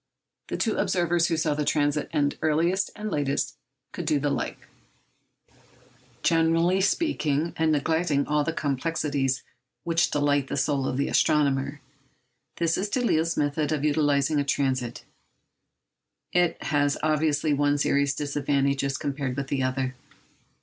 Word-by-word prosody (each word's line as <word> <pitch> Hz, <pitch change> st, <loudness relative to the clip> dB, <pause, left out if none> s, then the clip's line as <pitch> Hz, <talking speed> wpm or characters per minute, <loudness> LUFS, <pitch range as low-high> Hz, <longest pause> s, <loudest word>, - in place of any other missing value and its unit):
The -, -, -3 dB
two 225 Hz, -, 0 dB
observers 175 Hz, -1 st, +1 dB
who 165 Hz, -, 0 dB
saw 155 Hz, -1 st, +1 dB
the 150 Hz, +1 st, -1 dB
transit 145 Hz, 0 st, 0 dB
end 145 Hz, -1 st, +1 dB
earliest 170 Hz, +5 st, +1 dB
and 215 Hz, -1 st, -5 dB
latest 145 Hz, -1 st, -1 dB, 0.4 s
could 175 Hz, -, -6 dB
do 155 Hz, -2 st, +2 dB
the 145 Hz, +1 st, 0 dB
like. -, -, -2 dB, 0.9 s
Speaking -, -, -30 dB
generally, 165 Hz, +3 st, +3 dB, 0.7 s
and 160 Hz, -1 st, +1 dB
neglecting 155 Hz, 0 st, +1 dB
all 150 Hz, 0 st, +1 dB
the 165 Hz, -, -1 dB
complexities 140 Hz, -3 st, -1 dB, 0.4 s
which 165 Hz, -1 st, +2 dB
delight 145 Hz, -1 st, +1 dB
the -, -, -3 dB
soul 135 Hz, 0 st, 0 dB
of 130 Hz, -, -2 dB
the 140 Hz, -, 0 dB
astronomer, 140 Hz, -1 st, +1 dB, 0.7 s
this 165 Hz, -1 st, 0 dB
is 200 Hz, +2 st, -2 dB
Delisle's 170 Hz, -9 st, +1 dB
method 145 Hz, +1 st, 0 dB
of 150 Hz, -1 st, 0 dB
utilising 145 Hz, -1 st, +2 dB
a -, -, +2 dB
transit. 130 Hz, -3 st, -1 dB, 1.3 s
It 175 Hz, -1 st, +1 dB
has 145 Hz, -1 st, +1 dB
obviously 155 Hz, 0 st, +1 dB
one 145 Hz, 0 st, +2 dB
serious 140 Hz, -1 st, +1 dB
disadvantage 140 Hz, -1 st, 0 dB
as 135 Hz, -1 st, -1 dB
compared 140 Hz, -2 st, -3 dB
with 140 Hz, 0 st, -3 dB
the 135 Hz, -, 0 dB
other. 130 Hz, 0 st, -1 dB
145 Hz, 140 wpm, -26 LUFS, 140-160 Hz, 1.3 s, generally